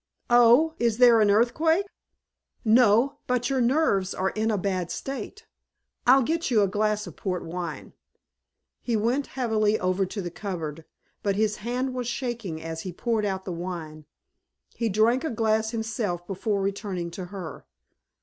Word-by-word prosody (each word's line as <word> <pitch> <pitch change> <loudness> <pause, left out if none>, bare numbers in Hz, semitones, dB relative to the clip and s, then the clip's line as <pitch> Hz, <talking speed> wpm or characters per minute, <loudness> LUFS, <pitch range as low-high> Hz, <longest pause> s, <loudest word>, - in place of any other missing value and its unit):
"Oh 245 +7 +6
is 230 -2 +1
there 240 -2 +6
an 210 - +4
earthquake?" 315 - +3 0.8
"No! 235 +4 +4
But 250 +1 0
your 265 -1 +1
nerves 235 -7 +2
are 190 +1 0
in 220 +1 -1
a 215 - +1
bad 185 -2 -2
state. 275 - -6 0.6
I'll 260 +2 +7
get 325 +5 -1
you 220 -5 +4
a - - +2
glass 210 +1 0
of - - -10
port 180 -3 -3
wine." 170 -2 -6 0.9
He 235 -3 0
went 240 +6 0
heavily 220 -4 +1
over 185 +1 0
to 205 - -6
the 175 -3 -4
cupboard, 165 -5 -5 0.4
but 200 -1 0
his 210 0 +1
hand 250 +4 -2
was 250 -2 -3
shaking 235 -9 -4
as 165 0 -5
he 185 - -5
poured 220 +4 -1
out 190 -1 -3
the 185 - -4
wine. 165 -3 -6 0.7
He 230 -2 -1
drank 225 +6 +2
a 320 - -1
glass 220 -1 +1
himself 220 -6 -3
before 195 +1 -2
returning 195 -3 -3
to 180 +2 -6
her. 180 -4 -8
215 Hz, 160 wpm, -26 LUFS, 185-240 Hz, 0.9 s, I'll